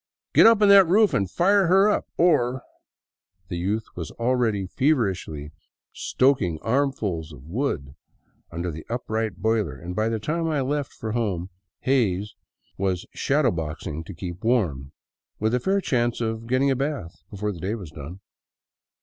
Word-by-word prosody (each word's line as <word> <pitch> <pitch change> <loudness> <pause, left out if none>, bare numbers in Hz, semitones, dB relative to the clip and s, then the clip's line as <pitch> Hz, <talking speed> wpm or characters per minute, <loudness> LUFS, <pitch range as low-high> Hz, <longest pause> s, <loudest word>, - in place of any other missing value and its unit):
Get - - +8
up 225 -2 +5
on - - +6
that 195 -2 +8
roof 205 +4 +4
and 100 -2 +1
fire 195 - +4
up 210 - +1
or.. 130 -7 +2 0.4
." 90 -1 -48
The 90 - -3
youth 105 +5 -1
was 85 -3 -5
already 115 -5 0
feverishly 95 - -1 0.4
stoking 125 - +1
armsful 115 -9 0
of 65 -4 -12
wood 80 - -3 0.6
under 85 +1 -4
the 80 0 -8
upright 110 -4 -2
boiler, 110 - +1
and 90 +4 -7
by 110 +2 +1
the 115 - -1
time 165 +10 -2
I 150 -3 0
left 140 +1 -2
for 110 - -6
home 95 -6 -2 0.3
Hays 105 -7 +1 0.5
was 95 -2 -1
shadow 140 -3 +2
boxing 80 -2 -4
to 95 - -8
keep 90 +1 -7
warm, 85 - 0 0.5
with 110 +2 0
a 125 - +2
fair 195 +10 +1
chance 120 -9 0
of 115 0 -3
getting 130 +3 +2
a - - +2
bath 135 - -4
before 105 +1 -3
the 90 - -8
day 95 +6 -2
was 95 -9 -8
done. 75 +6 -9
110 Hz, 160 wpm, -24 LUFS, 90-135 Hz, 0.6 s, Get